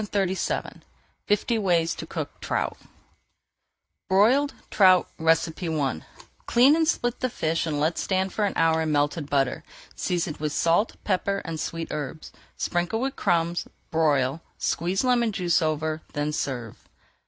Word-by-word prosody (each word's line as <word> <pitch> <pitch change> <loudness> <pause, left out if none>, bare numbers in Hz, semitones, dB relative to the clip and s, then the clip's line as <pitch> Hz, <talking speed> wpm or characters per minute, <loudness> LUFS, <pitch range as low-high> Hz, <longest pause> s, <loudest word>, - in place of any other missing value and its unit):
[Page 210 - -6
411] 190 -2 -1 0.5
FIFTY 220 +2 +1
WAYS 170 -5 +2
TO - - -7
COOK - - -5
TROUT - - -1 1.3
BROILED 240 +10 +4 0.2
TROUT 185 -3 +5
I 160 - 0 0.5
Clean 260 +5 +6
and 325 -1 +2
split 240 -6 0
the 255 - 0
fish 165 -5 -1
and 150 -2 -1
let 160 +3 0
stand 190 0 0
for 215 - 0
an 200 - -1
hour 160 0 +3
in 160 -1 -1
melted 145 +1 0
butter, 135 -3 0 0.3
seasoned 170 -4 -2
with 150 -1 -3
salt, 170 +7 +2
pepper, 195 0 0
and 165 -2 -4
sweet 165 +1 -4
herbs. 150 +1 -5 0.3
Sprinkle 175 +5 -1
with 270 +2 -2
crumbs, 170 0 0 0.2
broil, 150 -2 +2 0.2
squeeze 180 +6 0
lemon 240 -3 +2
juice 180 -3 +1
over, 155 0 -1
then 145 +1 -1
serve. 120 -7 -4
170 Hz, 140 wpm, -25 LUFS, 155-200 Hz, 1.3 s, Clean